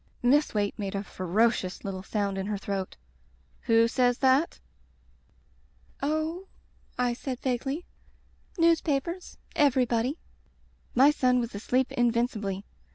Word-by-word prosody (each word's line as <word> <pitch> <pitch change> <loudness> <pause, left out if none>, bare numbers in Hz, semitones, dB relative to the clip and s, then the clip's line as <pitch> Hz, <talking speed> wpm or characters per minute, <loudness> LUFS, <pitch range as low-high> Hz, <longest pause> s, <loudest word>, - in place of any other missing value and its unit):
Miss 280 +1 +3
Waite 205 -1 +1
made 200 -1 -3
a 200 - -2
ferocious 190 +1 0
little 190 -1 -4
sound 200 -1 -2
in 190 - -3
her 210 -1 -1
throat: 195 -1 -4 0.7
"Who 230 0 +5
says 245 +1 +2
that?" 265 +4 +2 1.4
"Oh," 315 +6 -1 0.5
I 245 -1 +1
said 255 +1 -5
vaguely, 270 +6 -2 0.7
"newspapers— 335 0 +1
» - - -26
everybody." 250 0 +1 0.8
My 270 +4 +7
son 255 -4 +2
was 235 -1 -3
asleep 250 +5 0
invincibly. 230 -5 0
245 Hz, 115 wpm, -28 LUFS, 205-275 Hz, 1.4 s, My